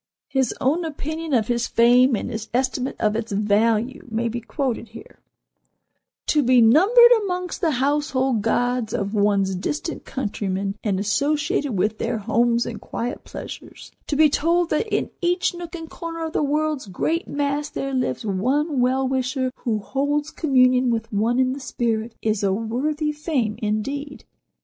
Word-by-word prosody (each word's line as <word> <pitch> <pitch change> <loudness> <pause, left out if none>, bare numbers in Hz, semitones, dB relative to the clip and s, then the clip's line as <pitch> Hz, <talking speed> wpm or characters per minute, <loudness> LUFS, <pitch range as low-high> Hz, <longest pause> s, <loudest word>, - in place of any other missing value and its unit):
His 265 -3 +1
own 285 +6 +1
opinion 315 +1 -4
of 220 -3 +1
his 240 -1 0
fame, 245 +2 +5
and 220 - -4
his 220 -1 -5
estimate 260 0 -1
of 210 0 +1
its 225 0 -3
value, 215 +5 +1
may 230 +1 -1
be 235 +1 -4
quoted 235 0 -3
here: 225 +2 -13 1.1
"To 300 - +3
be 255 -1 +4
numbered 390 - +7
amongst 360 -2 -3
the 335 - +2
household 270 -3 +1
gods 245 +1 0
of 200 +1 -2
one's 200 -2 +2
distant 295 - -3
countrymen, 200 -5 -3
and 195 -3 0
associated 290 +5 0
with 215 +3 0
their 230 0 -1
homes 235 +2 +1
and 225 - -6
quiet 240 +1 -5
pleasures; - - -9 0.2
to 295 - -1
be 310 +1 +6
told 335 +4 +1
that 310 +9 +1
in - - -1
each 355 +1 +1
nook 345 0 -7
and 325 -1 -7
corner 330 0 -6
of 320 - -6
the - - +1
world's 300 -3 0
great 315 - -1
mass 285 +1 -1
there 275 0 -4
lives 255 -3 -1
one 260 - 0
well 260 +2 +2
wisher 260 0 -1
who 225 -3 -1
holds 285 +7 -1
communion 255 -4 +3
with 225 -1 -2
one 225 +4 +1
in 255 0 +2
the 275 - -6
spirit, 230 -3 -2
is 215 -2 0
a 200 -1 +2
worthy 265 +9 -1
fame, 295 -8 -1
indeed. 275 +7 -3
255 Hz, 165 wpm, -23 LUFS, 225-295 Hz, 1.1 s, numbered